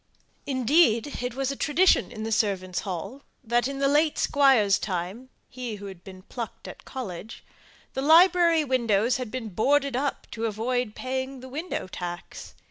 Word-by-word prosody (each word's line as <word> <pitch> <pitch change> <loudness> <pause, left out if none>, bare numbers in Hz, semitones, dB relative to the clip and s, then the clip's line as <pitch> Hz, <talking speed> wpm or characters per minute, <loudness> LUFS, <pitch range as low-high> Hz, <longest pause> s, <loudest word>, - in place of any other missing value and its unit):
Indeed, 260 -1 +2
it 245 -1 -3
was 270 0 -1
a - - -4
tradition 335 +3 +3
in 220 -2 -6
the 225 - -3
servants' 190 -5 0
hall 195 - -5 0.2
that, 240 +1 +1
in 275 0 -5
the 275 0 +2
late 295 +2 +2
squire's 255 -9 +4
time 190 +7 -4 0.2
he 245 -3 -6
who 205 0 -10
had 190 -3 -10
been 185 -1 -12
plucked 235 +2 -7
at - - -11
college 220 -5 -7 0.5
the 265 - -2
library 335 +1 +5
windows 240 -3 +1
had 250 -3 -5
been 240 -2 -5
boarded 275 +7 +1
up 280 +2 -2
to 230 0 -2
avoid 225 +1 -2
paying 260 +1 -4
the 260 - -10
window 310 - -4
tax. 175 -1 -7
250 Hz, 165 wpm, -26 LUFS, 210-275 Hz, 0.5 s, library